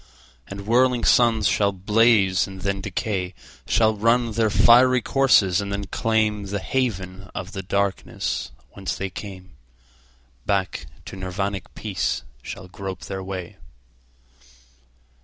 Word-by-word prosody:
And 100 0 -8
whirling 125 +2 +3
suns 115 -4 +4
shall 100 -1 +2
blaze 100 -1 +3
and 95 -1 -10
then 100 0 -1
decay, 95 -2 -3 0.3
Shall 110 -1 +3
run 115 +2 +2
their 110 0 +1
fiery 125 +4 +6
courses 105 -9 +4
and 100 0 -5
then 100 0 -3
claimThe 105 -1 0
haven 95 -5 -3
of 95 0 -5
the 95 - -5
darkness 100 +1 -2 0.2
whence 95 -1 -4
they 95 -1 -4
came; 95 -2 -9 0.9
Back 95 -9 -1 0.2
to - - -8
Nirvanic 95 +1 -3
peace - - -2 0.2
shall 95 -2 -8
grope 95 0 -7
their 95 0 -5
way. 95 0 -6
100 Hz, 120 wpm, -23 LUFS, 95-110 Hz, 0.9 s, fiery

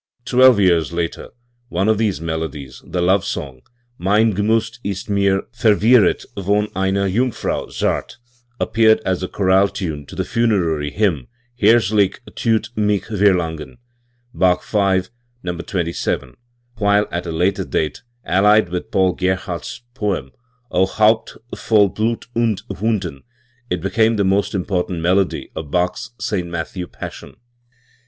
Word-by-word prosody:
Twelve 130 -3 +5
years 85 -5 +3
later, 85 -1 -3 0.4
one 95 +4 0
of 110 -1 +2
these 105 -4 0
melodies, 80 -5 -5
the 90 -1 -2
love 95 +1 +3
song 65 -3 -5 0.4
"Mein 105 +4 +3
G'nrat 110 +4 0
ist 100 +1 -4
mir 100 -1 +2
verwirret 110 -2 +3
von 100 +2 0
einer 95 +1 +1
Jungfrau 120 +6 -1
zart" - - -2 0.4
appear 110 -1 +4
ed - - -4
as 95 -1 0
a 95 - -2
chorale 95 +1 +3
tune 80 -8 -5
to - - -10
the - - -2
funerary 95 -10 0
hymn 85 - 0 0.3
"Herzlich 105 -2 +4 0.2
thut 110 -1 0
mich 105 -2 +1
verlangen" 90 -4 0 0.6
(Bach 90 -3 +2
V, 95 -3 +1 0.4
No. 90 -1 -3
27), 85 -1 -3 0.5
while 100 0 +3
at 85 0 -3
a - - -3
later 90 +4 0
date, 75 - -2 0.2
allied 105 +1 +4
with 90 0 -4
Paul 95 -1 +2
Gerhardt's 95 +2 -3
poem 100 - -2 0.4
"O 95 - +3
Haupt 110 +3 +2 0.2
voll 105 -3 +3
Blut 110 +4 -2
und 115 -4 0
Wunden", 95 -6 -2 0.5
it 90 -2 -2
became 110 +4 +2
the 100 - +1
most 100 +2 +1
important 90 -2 -1
melody 90 -1 0
of 80 -2 -6
Baches 90 +3 -1
St. 90 -5 -2
Matthew 85 +2 -5
Passion. - - -9
95 Hz, 135 wpm, -19 LUFS, 90-105 Hz, 0.6 s, Twelve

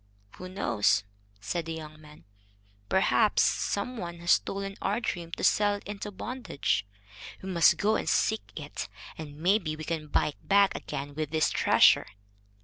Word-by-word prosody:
"Who 185 - -8
knows?" 105 - +1 0.4
said 170 +9 -3
the 165 - -3
young 155 -1 -9
man; 150 - -15 0.7
"perhaps 200 +3 +3
some 250 +5 -1
one 170 -4 -5
has 175 - +1
stolen 195 0 0
our 205 +4 0
dream 175 -8 -4
to - - -5
sell 205 -1 +3
it 200 - -9
into 205 0 -6
bondage. 205 - -2 0.6
We 190 - -5
must 170 -3 +5
go 215 +1 +2
and - - -2
seek 220 0 +2
it, 150 -2 -6 0.3
and 145 -2 -9
maybe 175 -1 +1
we 155 - -8
can 155 -1 -3
buy 150 - +1
it 145 - -14
back 200 0 +5
again 140 +1 -5
with 155 0 -3
this 155 0 +1
treasure." - - +5
175 Hz, 165 wpm, -28 LUFS, 155-200 Hz, 0.7 s, must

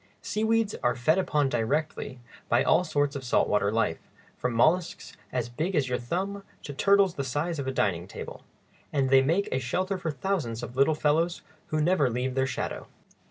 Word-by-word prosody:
Seaweeds 220 0 +1
are 120 - +2
fed 155 +8 +2
upon 150 -6 +1
directly 130 +2 -2 0.3
by - - +4
all - - +4
sorts 145 -3 0
of 135 - -5
salt 125 - +2
water 105 -1 +2
life, 110 -7 0 0.4
from 125 - -2
mollusks 165 +8 +1 0.2
as 125 -2 -1
big 160 +10 -2
as 135 -4 +1
your 125 - 0
thumb 190 +11 -3 0.2
to 145 - -6
turtles 200 +4 +4
the 140 - -3
size 145 +5 -2
of 135 - -3
a - - 0
dining 90 -8 0
table, - - -8 0.5
and 135 -3 +1
they 135 0 +7
make 165 +9 +1
a 130 - +1
shelter 185 +10 -1
for 170 - -3
thousands 140 - -2
of 120 - -7
little 140 +4 +3
fellows 160 +3 +1 0.2
who 155 - -1
never 155 -4 +3
leave 125 +2 -2
their 130 0 +1
shadow. 130 - -4
145 Hz, 190 wpm, -27 LUFS, 125-175 Hz, 0.5 s, they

